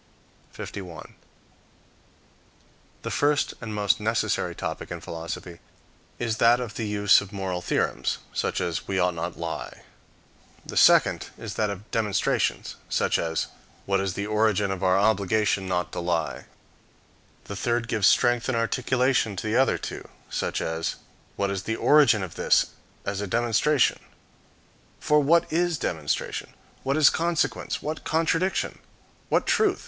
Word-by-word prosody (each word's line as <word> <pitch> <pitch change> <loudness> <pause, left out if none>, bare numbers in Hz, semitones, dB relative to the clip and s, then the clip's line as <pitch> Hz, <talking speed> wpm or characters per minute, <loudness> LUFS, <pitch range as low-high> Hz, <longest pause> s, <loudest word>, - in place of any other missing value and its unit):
51. 90 -5 -8 1.9
The - - -4
first 145 0 +1
and 115 -2 -5
most 105 -1 +2
necessary 110 +1 0
topic - - -5
in - - -5
philosophy 85 +1 -7 0.6
is 115 -2 -2
that 120 +2 +5
of 120 -4 -5
the 110 -2 -3
use 105 -1 +4
of 100 0 -10
moral 95 -3 -3
theorems, - - 0 0.2
such - - -1
as, 80 -3 -3
"We 95 - -1
ought 90 -1 +2
not 85 +1 -4
to - - -18
lie;" 85 -1 -5 0.8
the - - -8
second - - +5
is - - -6
that 105 -1 0
of 100 +2 -7
demonstrations, 105 -5 0
such - - +1
as, 80 -1 -1 0.4
"What 100 0 +1
is 95 -1 -2
the 100 - -2
origin 105 -2 +1
of 95 -1 -4
our 95 0 +4
obligation 100 -1 +2
not 90 -1 -1
to - - -4
lie;" 85 -2 -2 1.0
the 100 - -7
third 120 +3 -1
gives 110 -4 +2
strength 120 0 +3
and 125 - +1
articulation 125 -1 +1
to 95 - -5
the 110 +1 0
other 135 +2 +3
two, - - -7 0.2
such - - -2
as, 80 0 -2 0.4
"What 100 0 -1
is 100 -1 -2
the 110 +3 -2
origin 125 -7 +5
of 90 - -6
this - - +2 0.3
is 100 0 -2
a 105 - -3
demonstration." 120 +6 +2 1.0
For 150 0 +3
what 165 +4 +4
is 175 -1 +1
demonstration? 80 - -3 0.3
What 135 +2 0
is 155 - +6
consequence? 170 -1 -1
What 155 +1 -4
contradiction? 165 +3 0 0.5
What - - +2
truth? 415 -3 +2
105 Hz, 150 wpm, -26 LUFS, 95-120 Hz, 1.9 s, is